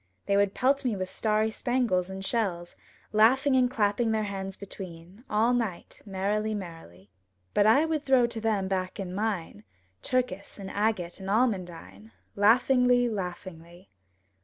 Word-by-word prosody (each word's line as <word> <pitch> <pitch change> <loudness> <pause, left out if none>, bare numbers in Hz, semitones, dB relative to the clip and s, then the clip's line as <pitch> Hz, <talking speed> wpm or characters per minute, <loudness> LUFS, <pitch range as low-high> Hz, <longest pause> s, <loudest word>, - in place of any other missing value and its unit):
They 200 - +1
would 200 -1 +2
pelt 275 +2 +2
me 245 -5 0
with 185 -1 -4
starry 215 0 0
spangles 225 -7 0
and 190 0 -6
shells, 185 -7 -2 0.4
Laughing 260 +6 +4
and 250 -1 +4
clapping 225 -1 +1
their 220 -1 +1
hands 195 -1 -5
between, 185 0 -10
All 220 +3 +2
night, 225 -8 -3
merrily, 210 +3 -1
merrily. 165 - -10 0.4
But 205 - +4
I 275 +8 +5
would 315 -2 -1
throw 260 -3 +4
to 230 -1 -4
them 210 -4 0
back 185 0 -3
in 185 -2 -5
mine 190 - -3 0.4
Turkis 245 -7 -2
and 195 -2 -7
agate 205 -5 -1
and 190 0 -6
almondine; 175 - -2 0.2
Laughingly, 245 +3 +4
laughingly. 180 -3 -7
205 Hz, 145 wpm, -28 LUFS, 185-235 Hz, 0.4 s, I